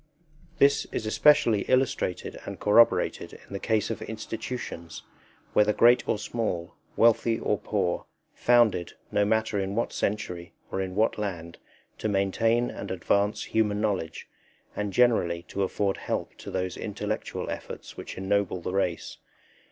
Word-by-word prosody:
This 140 0 +4
is - - -3
especially 110 -2 +4
illustrated 130 -8 0
and - - -7
corroborated 115 +3 +3
in - - -13
the 100 - -3
case 110 0 0
of 115 - -5
institutions 110 -5 -6 0.5
whether 105 0 +4
great 120 +3 +5
or - - +2
small, 105 -6 -3 0.2
wealthy 115 0 +4
or 105 - 0
poor, 95 -5 -1 0.3
founded, 120 -8 +3 0.2
no 105 - +2
matter 110 -1 +1
in 95 +1 -2
what 115 - -1
century 90 -3 -3 0.2
or 95 - -1
in 95 -1 -4
what 110 +1 +2
land, 85 -5 -5 0.4
to 110 - -1
maintain 115 +5 +1
and 100 - -7
advance 100 +3 +1
human 105 -2 0
knowledge, 100 -7 -2 0.5
and 105 -1 -2
generally 90 -7 +2
to 100 - -3
afford 100 0 0
help - - -3
to - - -8
those 95 -1 -3
intellectual 105 +1 -4
efforts - - -7
which - - -8
ennoble 95 -1 0
the 90 - -4
race. 90 -4 -2
105 Hz, 145 wpm, -27 LUFS, 95-110 Hz, 0.5 s, great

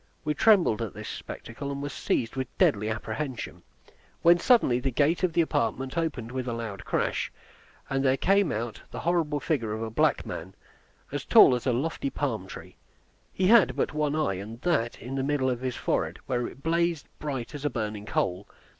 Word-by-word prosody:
We 150 - +1
trembled 175 - +4
at 115 -4 -4
this - - -7
spectacle, 140 +5 -6
and 140 - -4
were 145 - -3
seized 115 -3 -1
with 130 -1 -2
deadly 105 +1 +3
apprehension, 110 -3 -4 0.6
when 170 +1 +7
suddenly 175 - +4
the 135 +2 -1
gate 150 +6 +2
of 185 -3 +1
the 170 - +4
apartment 135 -3 -1
opened 145 -9 -2
with 130 -1 -3
a 120 - -1
loud 115 -4 -5
crash, - - -1 0.6
and 135 0 0
there 130 0 +3
came 195 -1 +3
out 115 +1 -4
the - - -6
horrible 165 -4 +1
figure 120 -9 -1
of 110 +1 -3
a 110 - -4
black 110 - +2
man, 95 +4 -7 0.6
as - - -3
tall - - +7
as 125 +1 -2
a - - +4
lofty 140 +3 -1
palm 115 -10 -2
tree. - - -10 0.5
He 185 - -1
had 225 0 +6
but - - -1
one 150 -1 0
eye, 125 -12 0
and 110 +4 -8
that 145 -10 0
in 125 - -7
the 135 0 -1
middle 135 -2 +1
of 125 -1 -3
his 130 -2 -2
forehead, - - -1
where 120 -2 -1
it 135 - -12
blazed 170 -1 +1
bright 135 -3 -4
as 145 -1 -7
a 145 - +1
burning 105 -4 -4
coal. 95 +1 -1
135 Hz, 200 wpm, -27 LUFS, 115-155 Hz, 0.6 s, when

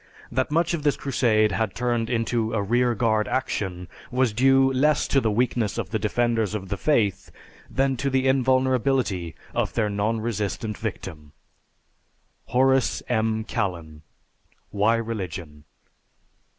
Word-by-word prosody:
That 130 +2 0
much 170 +3 +1
of 170 - -2
this 145 -1 +1
crusade 115 -5 +2
had 110 0 -1
turned 120 -1 -1
into 115 -1 0
a 105 - +1
rear 120 +3 +2
guard 110 -1 +1
action 95 -8 -2 0.2
was 125 -3 +1
due 135 +3 +4
less 145 +3 +2
to 135 - +2
the 110 - +1
weakness 115 0 0
of - - -4
the 110 - 0
defenders 110 0 0
of 95 -3 -5
the 100 - -1
faith 100 -9 0 0.4
than 135 0 +1
to 140 +3 -1
the 130 0 +1
invulnerability 130 - +1 0.2
of - - -1
their 105 -2 +1
non 105 +3 0
resistant 110 -1 -3
victim._ 80 -9 -6 1.2
HORACE 130 +1 +2
M. 110 -2 0
KALLEN, 85 -8 -4 0.7
"Why 105 +3 +2
Religion?" 90 -10 -5
115 Hz, 135 wpm, -24 LUFS, 105-130 Hz, 1.2 s, due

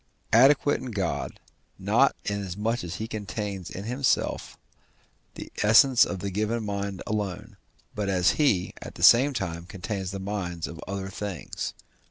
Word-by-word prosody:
adequate 135 +4 +5
in 130 - -6
God, 95 -6 -3 0.4
not - - +3
inasmuch 100 +3 -2
as 85 0 -5
he 110 - -4
contains 105 -3 -5
in 95 - -7
himself 125 +3 -1 0.8
the - - -8
essence 115 +4 +6
of 100 - -4
the 100 - -3
given 110 +4 -1
mind 100 -1 -3
alone, 105 -4 -3 0.4
but 105 -1 -2
as 90 -2 +3
he, 105 - +1
at - - -9
the - - -6
same 130 +5 +7
time, 85 -9 -4
contains 95 0 -4
the 100 - -5
minds 95 -4 -3
of 85 0 -8
other 95 0 -4
things. 95 -4 -5
100 Hz, 150 wpm, -26 LUFS, 95-110 Hz, 0.8 s, same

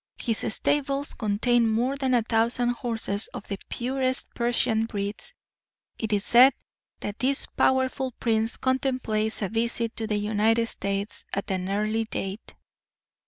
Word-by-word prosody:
His 225 -2 0
stables 280 0 0
contain 230 +2 +2
more 240 +5 +1
than 265 -2 +1
a 235 - +3
thousand 235 +2 +2
horses 225 -4 -1
of - - -7
the 200 -1 -4
purest 260 +1 0
Persian 235 -2 +1
breeds. 205 - -4 0.6
It 220 -1 -2
is 205 -1 +1
said 255 +3 +7 0.5
that 205 +1 -5
this 270 +2 +1
powerful 260 0 +1
prince 225 -1 +1
contemplates 255 -5 0
a 195 - -1
visit 230 0 -1
to 225 - -2
the 210 -1 0
United 215 +2 +2
States 200 -2 -3
at 200 0 -2
an 185 0 -2
early 215 +3 0
date. 195 -1 -5
225 Hz, 140 wpm, -26 LUFS, 215-255 Hz, 0.6 s, said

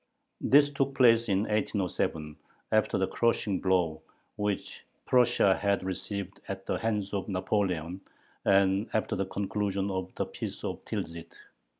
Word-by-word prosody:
This 145 +1 +5
took 135 -1 -1
place 115 -3 +5
in 95 0 +3
1807, 95 -7 -1 0.4
after - - +2
the - - +2
crushing 115 -4 0
blow 90 -4 +1 0.3
which 105 -1 -3 0.2
Prussia 120 -6 +4
had 100 -1 0
received 95 +1 -4
at 95 -1 -5
the - - -1
hands 105 -3 -1
of 100 0 -2
Napoleon 95 -2 -1 0.4
and 100 +1 +3
after 110 - 0
the 95 +1 -1
conclusion 100 0 -1
of 95 -1 -3
the - - -1
Peace - - -7
of - - -4
Tilsit. 85 0 -5
100 Hz, 135 wpm, -29 LUFS, 95-105 Hz, 0.4 s, This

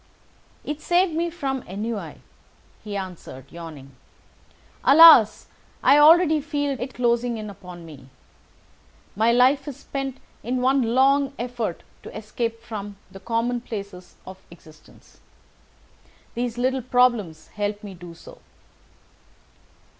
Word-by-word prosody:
"It 300 +1 -5
saved 350 0 +2
me 335 +2 -1
from 275 -6 -4
ennui," 210 +3 -5 0.7
he 205 -2 -5
answered, 180 -9 -8
yawning. 155 -5 -10 0.9
"Alas! 280 -8 +7 0.4
I 290 - +6
already 315 0 +6
feel 290 -1 -2
it 255 +1 -6
closing 240 -1 0
in 215 -1 -7
upon 180 -3 -12
me. 140 -5 -13 1.1
My 220 +3 +3
life 260 +4 +3
is 280 -3 -6
spent 270 -2 -5 0.2
in 250 +3 -2
one 255 -2 +1
long 275 +1 +3
effort 240 -6 -4 0.2
to - - -10
escape 230 +1 -4
from 205 -3 -7
the 195 - -11
commonplaces 230 -5 -4
of 190 0 -11
existence. 155 -2 -19 1.1
These 240 -1 -3
little 260 +2 0
problems 240 -10 +1
help 205 +1 -4
me 200 -2 -8
to 175 - -16
do 175 -1 -10
so." - - -15
235 Hz, 120 wpm, -23 LUFS, 200-270 Hz, 1.1 s, Alas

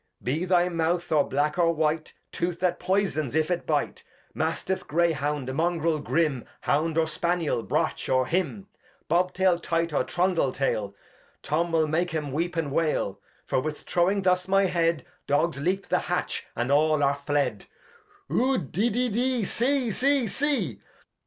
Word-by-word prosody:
Be 155 +8 -1
thy 180 -1 +3
Mouth, 170 0 -1
or 150 -2 +4
black, 150 +5 0
or 170 -1 +3
white. 155 0 0 0.2
Tooth 175 0 -2
that 180 -1 +1
poysons 180 -7 0
if 160 +2 +1
it 175 - -2
bite; - - -1 0.3
Mastiff, 190 - -2
Grey 170 +2 +2
Hound, 145 -3 -2
MungreU, 160 +1 0
Grim, 150 -8 +1 0.2
Hound, 160 +2 0
or 165 - +4
Spanniel, 165 -3 -1
Brach, - - -1
or 130 0 +3
dym; 190 +3 -1 0.4
Bob 180 +3 +2
Tail, 185 -2 +2
Tight, 165 -1 -1
or - - +2
Trundle 180 -6 +1
Tail, 105 -7 -1 0.5
Tom 170 +3 0
will 160 -1 +2
make 165 +2 0
'em 150 -3 -2
weep 170 +5 -2
and 160 -4 -1
wail; 140 -11 0 0.3
For - - +1
with 150 +3 -4
throwing 190 +3 +1
thus 180 0 +2
my 195 +1 +4
Head, 165 -5 +1 0.2
Dogs 145 0 +1
leap 190 +5 0
the - - +3
Hatch, - - -3
and 120 +3 -1
all 155 +1 +3
are 140 0 +1
fled. 145 -1 0 0.6
Ud, 250 - 0
de, 215 +7 +1
de, 245 +3 0
de. 245 +1 0
See, 250 +4 0
see, 270 +2 +2
see. 215 - -1
170 Hz, 165 wpm, -26 LUFS, 150-185 Hz, 0.6 s, or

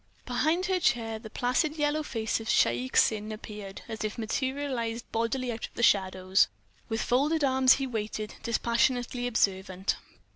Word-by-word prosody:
Behind 315 +8 +1
her 375 0 +1
chair 225 -6 +1
the 220 -1 -10
placid 255 +7 0
yellow 295 +1 +1
face 225 -7 -2
of 225 - -8
Shaik 120 +2 +2
Tsin 215 0 +3
appeared, 210 -2 -8
as 220 -2 -5
if 215 -1 -3
materialized 240 -1 -2
bodily 235 +2 -1
out 225 -1 -4
of - - -28
the 235 - -2
shadows. 190 -2 +3 0.4
With 225 0 -1
folded 295 +5 +2
arms 260 -1 +5
he 270 - -1
waited, 215 -3 -4
dispassionately 245 +1 +1
observant. 190 -4 0
230 Hz, 150 wpm, -28 LUFS, 215-260 Hz, 0.4 s, arms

